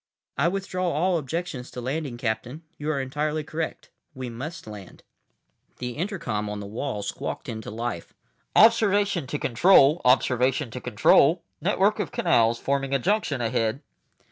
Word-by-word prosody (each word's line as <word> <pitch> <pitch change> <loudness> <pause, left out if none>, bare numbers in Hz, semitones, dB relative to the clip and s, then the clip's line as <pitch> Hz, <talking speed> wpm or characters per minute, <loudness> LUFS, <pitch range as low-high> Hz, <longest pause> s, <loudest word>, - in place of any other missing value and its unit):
"I 140 +5 +2
withdraw 185 -1 -2
all 170 +3 +1
objections 150 -3 -4
to - - -8
landing, 135 0 -3
Captain. 125 +6 -3 0.2
You 150 +1 -3
are 150 -3 0
entirely 150 +3 -2
correct. 155 +2 -5 0.2
We 130 -2 -5
must 155 +9 -7
land." 105 -4 -11 0.7
The 125 0 -4
intercom 135 - -3
on 105 0 -4
the 100 - -6
wall 105 +1 -4
squawked 100 - -5
into 110 -1 -6
life. 110 -5 -5 0.4
"Observation 205 - +4
to 150 - -2
Control. 150 +4 +5
Observation 130 +1 +2
to 125 - -6
Control. 140 - +4 0.2
Network 200 +3 +2
of 200 - -2
canals 115 0 +2
forming 135 +1 -1
a - - +5
junction 160 - 0
ahead." 115 +3 -1
140 Hz, 145 wpm, -25 LUFS, 120-170 Hz, 0.7 s, Control